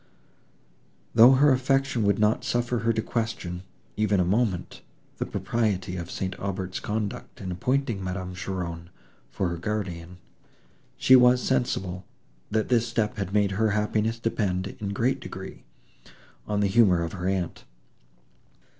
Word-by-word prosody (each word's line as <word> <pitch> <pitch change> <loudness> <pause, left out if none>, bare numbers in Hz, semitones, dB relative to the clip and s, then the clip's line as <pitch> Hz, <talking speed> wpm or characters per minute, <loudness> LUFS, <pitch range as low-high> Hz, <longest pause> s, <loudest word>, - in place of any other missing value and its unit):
Though 120 +3 +8
her 140 +2 +5
affection 135 -1 +1
would 100 -1 +3
not 105 +1 +2
suffer 120 0 0
her 115 0 +2
to 110 -1 -1
question, 110 -7 -3 0.3
even 105 -2 +2
a 90 - +3
moment, 100 -1 -1 0.4
the - - -3
propriety 100 -6 -1
of 85 -1 -5
St. 95 -1 -3
Aubert's 95 -1 -3
conduct 105 -1 -4
in 95 -2 -5
appointing 120 +2 -1
Madame 90 0 -4
Cheron 85 -2 -5 0.4
for 95 - -1
her 85 - -3
guardian, 90 -3 -4 0.8
she 130 - +6
was 125 0 +6
sensible, 95 -8 -1 0.5
that 110 0 0
this 120 -2 +3
step 110 -2 -1
had 95 -2 -3
made 100 -1 +2
her 110 +3 +1
happiness 110 +2 0
depend, 100 -5 -1
in 100 - -3
a - - -3
great 125 +6 0
degree, 95 0 -9 0.8
on 105 -1 0
the 100 - +3
humour 95 -5 +4
of 85 - -4
her 90 -1 -3
aunt. 95 -3 -2
105 Hz, 145 wpm, -26 LUFS, 90-115 Hz, 0.8 s, Though